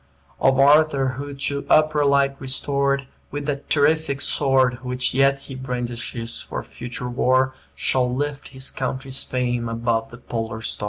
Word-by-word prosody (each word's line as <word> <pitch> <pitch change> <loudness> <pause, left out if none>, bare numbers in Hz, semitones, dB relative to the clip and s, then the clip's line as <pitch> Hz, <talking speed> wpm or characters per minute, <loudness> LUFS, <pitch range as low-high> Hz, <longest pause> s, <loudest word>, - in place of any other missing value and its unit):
"Of 135 0 +4
Arthur, 140 -1 +5
who, 140 +2 -6
to 140 +1 -2
upper 155 -1 +4
light 140 -1 +3
restored, 140 +1 0 0.2
With 145 0 -5
that 140 -1 -3
terrific 145 -1 +2
sword, 130 -3 +2
Which 125 0 0
yet 135 +1 +3
he 140 - -9
brandishes 120 -2 -4
for - - -5
future 120 0 -6
war, 130 +2 +2 0.2
Shall 125 -1 +1
lift 145 +2 -3
his 130 0 -3
country's 130 0 -3
fame 120 -2 -1
above 115 0 -1
the 120 - -11
polar 115 -2 -4
star." - - -2
135 Hz, 150 wpm, -23 LUFS, 125-140 Hz, 0.2 s, Arthur